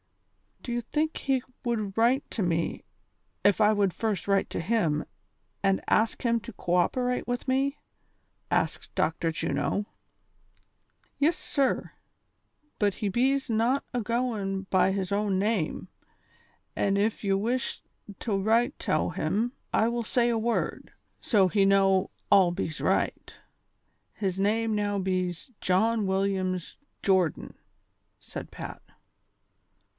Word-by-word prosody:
" - - -31
Do 245 - -5
you 240 0 0
think 305 +6 -1
he 265 -2 0 0.2
would 215 -5 -2
write 245 +5 +3
to 215 - -1
me 170 -2 -1 0.6
if 205 0 +4
I 210 0 +6
would 200 -3 +1
first 205 -2 -2
write 195 -1 +2
to - - -2
him 165 -6 +1 0.6
and 195 -1 +3
ask 220 +4 +2
him 235 -1 +2
to 235 - -9
co 175 - -3
operate 250 +8 +1
witli 245 +1 -3
me 265 +2 +2
V 285 - -31 0.4
" - - -45
asked - - -7
Dr. 165 +1 +1
Juno. 165 +5 -1 0.7
" - - -42
Yis, 310 +4 +3
sir; 275 -3 0 0.9
but 205 -3 +2
he 205 - -2
bees 265 +6 +1
not 235 +5 +2
agoin' 220 -5 -1
be 190 0 +4
his 190 -1 -2
own 200 -1 +1
name, 200 -5 -1 0.9
an' 200 0 +1
ef 210 +2 0
ye 195 -1 +2
wish 235 +6 -1 0.4
tow 205 -4 -1
write 230 +7 +2
tow - - 0
him, 235 +4 -1 0.2
I 220 - +3
will 235 0 -1
say 240 +2 +2
a 235 - +1
word, 230 +1 -2 0.3
so 200 -5 +4
he 200 +2 +2
know 195 -1 +4 0.2
all 190 -3 +6
bees 165 -3 -4
right. - - 0 0.8
His 195 -3 -2
name 220 +2 +1
now 205 -1 0
bees 185 +2 -2
John 210 +3 +2
Williams 190 -2 -1 0.3
Jordan, 185 -5 +1 0.3
" - - -48
said - - -8
Pat. - - -8
205 Hz, 140 wpm, -28 LUFS, 190-235 Hz, 0.9 s, I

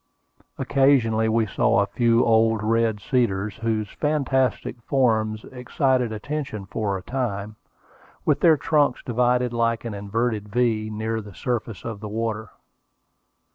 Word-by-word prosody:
Occasionally 115 -5 +3
we 110 0 +2
saw 100 - +2
a - - +2
few 115 +2 +2
old 110 -1 +3
red 115 -1 +1
cedars, 105 -3 0
whose 110 -2 -1
fantastic 135 -3 -1
forms 110 -4 +1
excited 125 -1 0
attention 110 -2 -4
for 100 0 -2
a 90 - -10
time, 110 -4 -3 0.7
with 145 -2 +2
their 160 -3 +5
trunks 145 -2 +1
divided 125 0 +1
like 115 0 0
an 115 - -4
inverted 105 +1 -2
V, 110 -2 0
near 110 +1 -2
the 100 -3 -12
surface 115 -4 -3
of 115 -3 -5
the 105 0 -7
water. 110 0 -3
115 Hz, 135 wpm, -24 LUFS, 110-125 Hz, 0.7 s, their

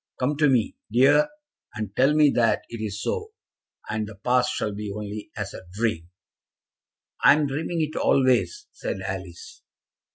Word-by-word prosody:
Come 140 +4 +1
to 150 -1 +4
me, 120 -5 +1 0.2
dear, 135 - +5 0.5
and 105 -2 -5
tell 135 +4 +4
me 150 -2 +5
that 115 -2 +2
it 115 -2 -7
is 100 -1 -4
so, 435 0 -3 0.5
and 110 0 -2
the 110 - -10
past 125 +5 +1
shall 105 - -2
be 105 0 -5
only 105 0 -6
as 105 -2 -4
a 95 - -10
dream." 100 -6 -1 1.1
"I - - +9
am 150 0 +1
dreaming 160 +4 -2
it 155 0 -2
always," 135 - +2
said - - -5
Alice. 460 +1 -7
125 Hz, 160 wpm, -25 LUFS, 105-150 Hz, 1.1 s, I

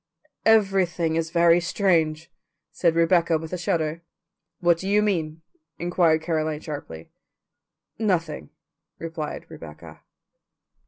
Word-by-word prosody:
"Everything 190 -6 +3
is 165 0 -1
very 170 0 +4
strange," 170 -4 0 0.4
said 170 -2 +1
Rebecca 170 -1 +3
with 160 +2 -8
a - - -1
shudder. 165 -3 -1 0.6
"What 175 -1 +3
do 190 - -4
you 210 +1 +3
mean?" 165 -6 -2 0.3
inquired 170 -2 +2
Caroline 155 -2 -1
sharply. 140 - -8 0.9
"Nothing," 170 - -1 0.5
replied 160 -2 -6
Rebecca. 75 -2 -12
165 Hz, 105 wpm, -24 LUFS, 155-180 Hz, 0.9 s, very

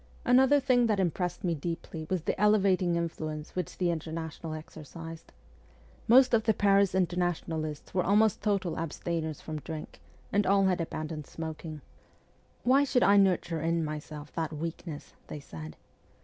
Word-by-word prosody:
Another 265 +3 +5
thing 255 -3 +3
that 210 -3 +1
impressed 180 -1 -1
me 175 -2 +1
deeply 160 0 -5
was 185 -4 -1
the - - -2
elevating 195 -4 +3
influence 155 -2 -4
which 180 -3 -4
the 180 -2 +1
Inter 160 -1 -4
national 160 0 -5
exercised. 160 +1 -10 0.8
Most 250 +2 +6
of 220 -1 +3
the 220 -2 +3
Paris 200 -2 +3
Internationalists 170 -4 -1
were 180 -1 +2
almost 210 +2 +3
total 195 -6 0
abstainers 160 -1 -3
from 155 -1 -5
drink, 155 0 -8 0.3
and 205 0 +2
all 195 0 +4
had 185 -2 +2
abandoned 155 -2 -5
smoking. 160 -1 -6 0.4
' - - -36
Why 265 +3 +5
should 260 -3 +2
I 205 - +6
nurture 180 -4 +2
in 165 0 0
myself 150 0 -7
that 160 -1 -2
weakness? 160 0 -6
' - - -33
they 150 - -6
said. 80 - -9
170 Hz, 160 wpm, -29 LUFS, 155-200 Hz, 0.8 s, Most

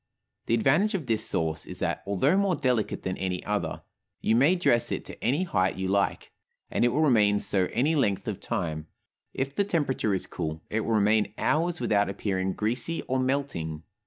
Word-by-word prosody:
The 115 - +3
advantage 155 - +2
of 170 -7 -3
this 110 -2 0
sauce 80 -1 -1
is - - -8
that - - -2
(although 130 - +2
more 195 -2 +2
delicate 125 -7 0
than 95 - -3
any 95 -1 -3
other) 105 0 -2 0.4
you 110 - +2
may 145 +9 +5
dress 120 -10 +2
it - - -3
to - - -10
any 140 +10 +2
height 95 - +1
you 95 0 -3
like, 100 0 0 0.4
and - - +1
it - - +5
will 130 +6 +1
remain 105 -7 +4
so 95 -3 +1
any 145 +7 +1
length 105 -10 +1
of - - -3
time; 80 -2 -3 0.5
if 135 +1 -2
the 200 - +1
temperature 140 - 0
is 95 - -2
cool, 80 -2 -5
it 110 - +1
will 115 0 0
remain 105 +1 +2
hours 170 +2 +1
without 100 -2 +2
appearing 95 -1 -2
greasy 125 +10 -1
or 130 0 -1
melting. 130 - -2
110 Hz, 190 wpm, -27 LUFS, 95-140 Hz, 0.5 s, may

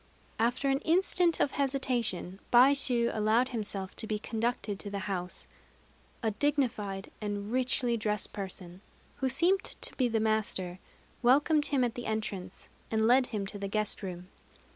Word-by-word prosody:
After 240 +4 +1
an 270 - +1
instant 345 +1 +2
of 285 - +2
hesitation, 245 -9 -1
Baishû 250 -2 +4
allowed 220 +4 +2
himself 205 -5 -3
to 220 - -5
be 215 - -1
conducted 220 -2 -2
to 205 - -5
the 200 - -4
house. 185 -3 -4 0.8
A 220 - +1
dignified 215 -6 -1
and 205 0 -4
richly 250 -1 +1
dressed 210 -2 -1
person, 185 -2 -7 0.4
who 265 -1 0
seemed 350 +9 +2
to - - -1
be 255 - +3
the 225 -1 0
master, 210 -5 0 0.4
welcomed 290 +5 +4
him 275 -3 +1
at 240 -2 0
the 245 - -6
entrance, 200 -4 -4 0.2
and 220 0 +1
led 250 +2 +5
him 210 -4 -3
to 200 +1 -4
the 200 - -3
guest 215 +1 0
room. 180 -2 -7
220 Hz, 155 wpm, -30 LUFS, 200-255 Hz, 0.8 s, led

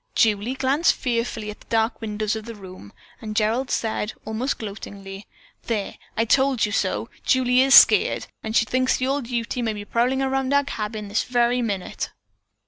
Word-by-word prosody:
Julie 220 +3 +2
glanced 275 +5 +2
fearfully 230 -4 -2
at 210 - -13
the - - -20
dark 225 +1 0
windows 215 -1 -2
of 220 -1 -6
the 230 -1 -8
room, 185 - -12 0.3
and 215 -1 -6
Gerald 230 +5 +1
said, 220 -1 -2
almost 220 +5 -2
gloatingly: 200 -2 -8 0.4
"There, 215 -4 -3 0.2
I 225 - +2
told 265 0 +3
you 210 - -4
so! - - -1
Julie 255 -1 +3
is 270 +1 +6
skeered. - - +6 0.3
She 230 +1 +3
thinks 255 +3 +1
the 255 - -1
old 270 -2 -1
Ute 235 0 -3
may 230 -3 -1
be 205 -1 -7
prowling 250 +5 +1
around 270 +1 0
our 285 - +4
cabin 215 -5 -5
this 205 +2 0
very 245 0 +2
minute." 200 -6 -3
230 Hz, 175 wpm, -23 LUFS, 210-255 Hz, 0.4 s, is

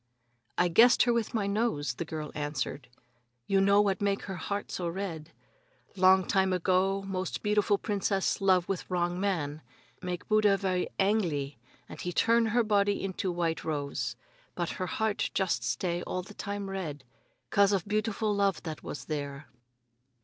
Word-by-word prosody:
"I 180 - +4
guessed 230 +9 +6
her 240 - +2
with 235 -1 -1
my 210 -3 +1
nose," 200 - 0
the 165 - -5
girl 155 -1 -5
answered. 145 -2 -3 0.6
"You 195 -1 +3
know 200 +1 +5
what 200 -1 0
make 200 -1 0
her 195 - -5
heart 200 +2 -4
so 175 - -2
red? 170 -3 -5 0.6
Long 190 0 +5
time 190 0 +2
ago, 185 +2 +1
most 190 -2 -3
beautiful 210 0 +2
princess 200 -2 0
love 185 -2 +3
with 195 -3 -3
wrong 175 0 0
man. 160 -7 -1 0.4
Make 180 -1 -4
Buddha 215 -2 +4
ve'y 185 -2 0
angly, 170 - +1 0.3
and - - -9
he 180 - -3
turn 230 +5 +3
her 235 +2 +2
body 205 -2 +2
into 190 -1 -2
white 170 -2 -1
rose. 145 -3 -2 0.4
But 175 -2 -2
her 185 - -3
heart 220 +1 -1
just 185 -11 +1
stay 170 +9 -1
all 185 0 -3
time 200 0 -5
red 155 -8 -5 0.5
'cause 200 0 +5
of 195 -1 0
beautiful 215 0 0
love 200 -1 +1
that 160 -2 -6
was - - -7
there." 145 -3 -5
190 Hz, 160 wpm, -29 LUFS, 170-205 Hz, 0.6 s, guessed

